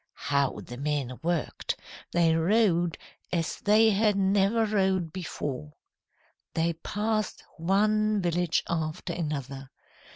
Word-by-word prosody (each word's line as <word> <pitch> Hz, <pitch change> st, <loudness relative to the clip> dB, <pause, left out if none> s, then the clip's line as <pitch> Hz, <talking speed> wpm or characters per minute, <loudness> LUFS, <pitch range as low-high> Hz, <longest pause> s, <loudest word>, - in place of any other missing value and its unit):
"How 140 Hz, -2 st, +2 dB
the 120 Hz, -, -9 dB
men 140 Hz, -3 st, -2 dB
worked! 170 Hz, -1 st, -2 dB, 0.3 s
They 170 Hz, -2 st, +3 dB
rowed 175 Hz, -1 st, +2 dB, 0.3 s
as 170 Hz, -2 st, -1 dB
they 215 Hz, +2 st, +5 dB
had 210 Hz, 0 st, +3 dB
never 200 Hz, +3 st, +3 dB
rowed 190 Hz, -5 st, +1 dB
before. 145 Hz, -, -5 dB, 0.8 s
"They 165 Hz, +1 st, +1 dB
passed 215 Hz, +5 st, -2 dB, 0.2 s
one 215 Hz, +4 st, +2 dB
village 175 Hz, -2 st, +1 dB
after 155 Hz, -2 st, -2 dB
another. 140 Hz, -5 st, -4 dB
175 Hz, 105 wpm, -28 LUFS, 155-205 Hz, 0.8 s, they